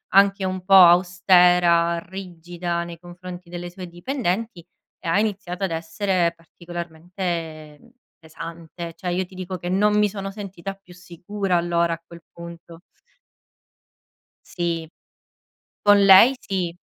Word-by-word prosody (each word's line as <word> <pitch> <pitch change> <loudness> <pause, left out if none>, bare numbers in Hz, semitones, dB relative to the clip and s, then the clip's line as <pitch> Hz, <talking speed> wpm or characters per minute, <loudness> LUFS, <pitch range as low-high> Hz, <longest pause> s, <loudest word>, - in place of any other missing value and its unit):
anche 195 0 +4
un 185 -1 -3
po' 195 +1 +1
austera, 175 -1 +5
rigida, 175 -1 -5
nei 170 -1 -9
confronti 175 0 -10
delle 175 0 -7
sue 180 0 -9
dipendenti 190 0 -3 0.4
e - - -9
ha 165 +4 +2
iniziato 200 -4 -3
ad 190 - -1
essere 170 +2 -1
particolarmente 170 -2 -6 0.4
pesante. 165 +1 -9
Cioè 180 - -4
io 185 +2 -1
ti 180 - -19
dico 185 0 -5
che 175 - -6
non 210 +3 +2
mi 210 0 +4
sono 195 -1 -6
sentita 195 -2 -7
più 195 -2 -18
sicura 180 +2 -3
allora 170 0 +1
a 165 0 -8
quel 170 0 -13
punto. 170 -1 -11 1.7
Sì. 170 -2 -3 0.9
Con 205 -1 +5
lei 195 +7 +8
sì. 185 -6 -3
175 Hz, 130 wpm, -23 LUFS, 170-190 Hz, 1.7 s, lei